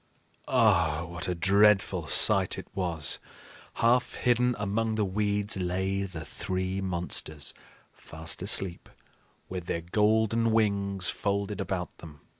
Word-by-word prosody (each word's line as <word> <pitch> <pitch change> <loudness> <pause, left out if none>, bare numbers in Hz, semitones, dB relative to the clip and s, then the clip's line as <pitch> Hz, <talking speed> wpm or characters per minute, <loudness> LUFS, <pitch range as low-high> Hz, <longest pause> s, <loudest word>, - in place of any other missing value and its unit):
Ah, 85 - +2
what 90 +2 -5
a 90 - -1
dreadful 100 +3 +3
sight - - +4
it - - -7
was! 85 -7 +1 0.6
Half 120 +2 +2
hidden 125 0 +2
among 110 +2 -1
the 105 -1 +1
weeds 105 +1 -1
lay 95 +2 -1
the 80 -4 -7
three 95 +4 -3
monsters, 85 -5 -2 0.4
fast 80 +2 -4
asleep, 95 -2 0 0.6
with 90 -2 -6
their 85 - -2
golden 110 +5 +2
wings 100 -4 +1
folded 100 -1 -2
about 90 -2 -4
them. 75 -3 -12
95 Hz, 120 wpm, -28 LUFS, 90-105 Hz, 0.6 s, sight